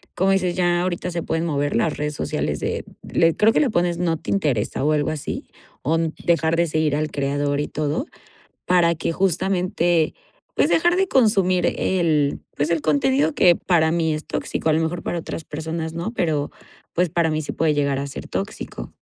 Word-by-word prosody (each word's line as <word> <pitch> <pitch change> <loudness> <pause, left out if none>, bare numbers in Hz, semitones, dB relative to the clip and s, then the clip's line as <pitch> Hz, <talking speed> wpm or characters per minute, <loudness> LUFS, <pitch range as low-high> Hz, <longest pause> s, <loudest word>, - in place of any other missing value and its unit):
como 190 +2 +2
dices, 185 -2 +1
ya 175 -1 +2
ahorita 180 0 -2
se 170 -1 -3
pueden 160 +1 -1
mover 145 -2 -1
las 150 +7 +1
redes 150 0 -2
sociales - - -2
de - - -2 0.3
le 165 0 +3
creo 220 +1 +4
que - - +3
le 280 - +2
pones 175 -2 +1
no 165 -2 +1
te 160 - -9
interesa, 145 - 0
o 150 - +3
algo 150 -1 +1
así 150 -3 -5 0.3
o 160 +5 +1 0.3
dejar 165 -1 +2
de 170 0 +2
seguir 155 -2 +1
al 155 0 -2
creador 145 0 -1
y - - -2
todo, 155 - -2 0.6
para 175 -2 +4
que 165 - -2
justamente, 180 -2 +1 0.4
pues, - - +3
dejar 345 +2 +3
de 385 0 +2
consumir 195 - +3
el 155 -6 +1 0.2
pues, 145 +2 0
el 165 -2 +1
contenido 145 0 +2
que 175 -1 +6
para 165 -3 +2
mí 165 -1 +1
es 155 0 -5
tóxico, - - -3
a - - +4
lo 160 - +2
mejor 165 +2 -2
para 175 - -2
otras 160 -1 -6
personas 160 +1 -4
no, 170 +7 -3
pero, 155 -8 -1 0.4
pues, 180 0 +1
para 165 0 +1
mí 155 0 0
sí 150 - -5
puede 160 -2 +1
llegar 140 -2 0
a 140 - -3
ser 140 - -8
tóxico. - - -5
165 Hz, 200 wpm, -22 LUFS, 150-175 Hz, 0.6 s, que